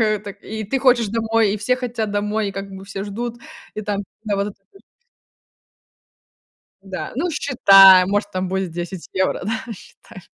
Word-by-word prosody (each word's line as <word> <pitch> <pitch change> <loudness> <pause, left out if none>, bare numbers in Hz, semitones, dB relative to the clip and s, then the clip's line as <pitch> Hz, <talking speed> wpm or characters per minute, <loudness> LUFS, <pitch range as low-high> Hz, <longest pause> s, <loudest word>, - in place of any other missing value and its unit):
А 215 -1 +2
так, 200 -1 -9
и 220 0 -6
ты 270 +7 -1
хочешь 250 -3 +3
домой, 225 -1 +1
и - - -1
все 235 +5 0
хотят 235 -4 -3
домой, 210 +1 -1
и - - -6
как 195 0 -6
бы 190 0 -10
все 195 0 -6
ждут. 235 +4 -5 0.4
И - - -4
там 205 -1 -2 0.2
да 205 -2 -1
вот 200 0 -1
этот 205 - -12
вот. 390 - -19 2.0
Да, 190 -1 -7
ну 340 +6 -1
считай, 195 - +7
может 205 +1 -1
там 185 0 -2
будет 190 -1 -2
10 175 +1 -6
евро, 190 0 0
да, 225 +3 -4
считай. 190 -1 -14
205 Hz, 180 wpm, -20 LUFS, 195-225 Hz, 2.0 s, считай